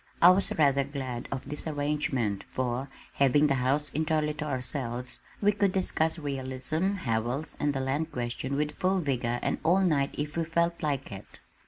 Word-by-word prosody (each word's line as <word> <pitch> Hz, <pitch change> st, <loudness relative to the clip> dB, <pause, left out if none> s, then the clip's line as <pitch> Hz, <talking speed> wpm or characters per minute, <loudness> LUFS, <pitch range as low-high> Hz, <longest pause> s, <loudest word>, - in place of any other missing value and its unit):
I 175 Hz, -, +9 dB
was 190 Hz, +1 st, +2 dB
rather 140 Hz, -3 st, +4 dB
glad 130 Hz, -3 st, -5 dB
of 135 Hz, -, -4 dB
this 150 Hz, +2 st, -1 dB
arrangement 145 Hz, -8 st, -1 dB
for, 130 Hz, +1 st, -2 dB, 0.2 s
having 140 Hz, +2 st, +4 dB
the 145 Hz, -, +3 dB
house 140 Hz, +3 st, +1 dB
entirely 155 Hz, 0 st, 0 dB
to 150 Hz, 0 st, -5 dB
ourselves, 125 Hz, -3 st, -3 dB, 0.2 s
we 205 Hz, 0 st, +5 dB
could 200 Hz, -1 st, +1 dB
discuss 160 Hz, -4 st, +1 dB
realism, 140 Hz, +5 st, -2 dB
Howells 125 Hz, -, -1 dB
and 145 Hz, -, +2 dB
the 135 Hz, -1 st, -2 dB
land 145 Hz, +5 st, -1 dB
question 125 Hz, +1 st, -3 dB
with 150 Hz, +1 st, 0 dB
full 185 Hz, +4 st, +1 dB
vigor 125 Hz, -6 st, 0 dB
and -, -, 0 dB
all 180 Hz, +4 st, +4 dB
night 150 Hz, -7 st, +1 dB
if 150 Hz, +2 st, -3 dB
we 165 Hz, -, +2 dB
felt 170 Hz, +1 st, 0 dB
like 140 Hz, -4 st, -2 dB
it. 100 Hz, 0 st, -10 dB
145 Hz, 175 wpm, -29 LUFS, 130-160 Hz, 0.2 s, I